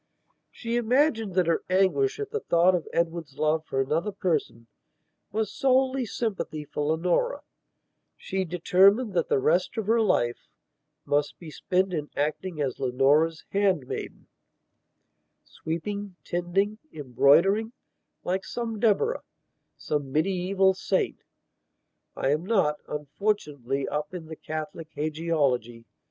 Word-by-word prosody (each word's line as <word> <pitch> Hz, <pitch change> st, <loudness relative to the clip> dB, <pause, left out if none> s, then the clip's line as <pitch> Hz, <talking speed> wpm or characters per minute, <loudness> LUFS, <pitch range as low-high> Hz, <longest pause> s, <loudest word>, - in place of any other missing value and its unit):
She 235 Hz, 0 st, -3 dB
imagined 235 Hz, -, +2 dB
that 185 Hz, -2 st, +3 dB
her 165 Hz, 0 st, +1 dB
anguish 195 Hz, -, +2 dB
at 425 Hz, -, -4 dB
the 445 Hz, -, -1 dB
thought 175 Hz, -, +3 dB
of 175 Hz, -3 st, -1 dB
Edward's 165 Hz, -4 st, -2 dB
love 155 Hz, +1 st, +1 dB
for 135 Hz, -, -2 dB
another 155 Hz, +9 st, 0 dB
person 160 Hz, -, -2 dB, 0.7 s
was 220 Hz, +1 st, -2 dB
solely 265 Hz, -1 st, +2 dB
sympathy 195 Hz, -9 st, -3 dB
for 145 Hz, -, -5 dB
Leonora; 175 Hz, -, 0 dB, 0.8 s
she 190 Hz, 0 st, -2 dB
determined 190 Hz, +6 st, +3 dB
that 170 Hz, -3 st, 0 dB
the -, -, +3 dB
rest 175 Hz, -, +1 dB
of 220 Hz, -, -1 dB
her 225 Hz, +2 st, +3 dB
life 120 Hz, -, +1 dB, 0.6 s
must 145 Hz, 0 st, 0 dB
be 165 Hz, -3 st, -10 dB
spent 185 Hz, +4 st, 0 dB
in 150 Hz, -3 st, -3 dB
acting 155 Hz, +3 st, -2 dB
as 135 Hz, -4 st, -2 dB
Leonora's 145 Hz, +6 st, +2 dB
handmaidensweeping, 195 Hz, +1 st, -5 dB
tending, 190 Hz, +5 st, -1 dB
embroidering, 155 Hz, -, +3 dB, 0.5 s
like 185 Hz, +1 st, -1 dB
some 225 Hz, -1 st, -4 dB
Deborah, 235 Hz, -, +2 dB, 0.6 s
some 145 Hz, -3 st, -3 dB
medieval 190 Hz, +4 st, +2 dB
saintI 190 Hz, 0 st, 0 dB, 1.0 s
am 150 Hz, +4 st, +1 dB
not, 185 Hz, -8 st, +2 dB
unfortunately, 150 Hz, -, -2 dB
up 150 Hz, +4 st, -3 dB
in 170 Hz, -3 st, -6 dB
the 160 Hz, 0 st, -8 dB
Catholic 155 Hz, +1 st, -6 dB
hagiology. 145 Hz, -7 st, -1 dB
175 Hz, 115 wpm, -26 LUFS, 150-205 Hz, 1.0 s, that